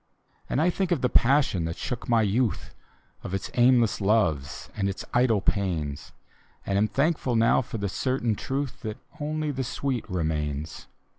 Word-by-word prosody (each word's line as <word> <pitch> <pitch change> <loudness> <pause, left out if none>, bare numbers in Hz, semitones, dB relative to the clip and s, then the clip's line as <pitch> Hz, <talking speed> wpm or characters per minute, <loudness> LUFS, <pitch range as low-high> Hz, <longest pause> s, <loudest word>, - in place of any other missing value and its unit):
And - - 0
I 170 +3 +3
think 190 0 -1
of 165 -7 +2
the 125 - +2
passion 130 - +3
that 85 0 -4
shook 120 - -5
my 115 -2 +4
youth, 110 0 0 0.5
Of 95 - -4
its 95 -2 -4
aimless 120 -3 +4
loves 95 -10 +1
and 100 -2 0
its 95 - -5
idle 120 -4 +3
pains, 80 -9 -1 0.5
And 100 - -1
am 105 - +3
thankful 140 -2 0
now 115 +2 +4
for 120 -2 -6
the 100 -1 -2
certain 120 +3 0
truth 135 +5 -3
That 110 -1 -5 0.2
only 155 0 -2
the 135 -1 -2
sweet 125 -1 -3
remains. 75 -4 -3
115 Hz, 165 wpm, -26 LUFS, 95-130 Hz, 0.5 s, my